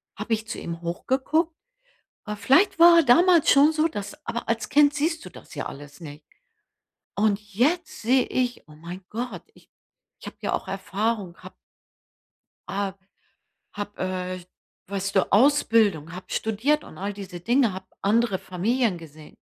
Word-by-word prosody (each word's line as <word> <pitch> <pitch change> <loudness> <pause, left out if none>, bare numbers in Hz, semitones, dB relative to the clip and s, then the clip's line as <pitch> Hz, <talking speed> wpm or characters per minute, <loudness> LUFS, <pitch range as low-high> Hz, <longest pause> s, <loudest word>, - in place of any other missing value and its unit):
habe 230 - -3
ich 220 0 -2
zu - - -5
ihm 170 0 -6
hochgeguckt. 265 - 0 0.7
Aber 210 -1 -4
vielleicht 275 - +3
war 340 0 +8
er 335 - +6
damals 335 +5 +5
schon 285 +3 +6
so, 315 +1 +2
dass 300 +4 -8
aber 235 0 -4
als 225 -1 -1
Kind 290 0 +4
siehst 320 +2 -1
du - - -9
das - - -14
ja - - -3
alles 145 +3 -11
nicht. 150 -1 -10 0.9
Und 205 -1 +2
jetzt 305 - 0
sehe 250 +3 +3
ich: 250 -1 -1
„Oh, 150 - -15
mein 175 +4 -9
Gott, 245 +3 -5
ich - - -22 0.5
ich - - -11
habe - - -9
ja - - -1
auch - - -3
Erfahrung, 195 -1 -2
habe“ 185 0 -13 1.1
„ah, 195 -1 -2 0.8
habe, 205 0 -6
äh 185 -1 -3 0.4
weißt 195 0 -3
du, 190 - +2
Ausbildung, 215 - +3
habe 185 +1 -9
studiert 240 +8 0
und - - -13
all 200 +1 -2
diese 195 -3 -8
Dinge, 235 +2 +2
habe 190 0 -8 0.2
andere 210 0 +2
Familien 210 +2 0
gesehen.“ 155 -1 -14
215 Hz, 160 wpm, -25 LUFS, 185-270 Hz, 1.1 s, war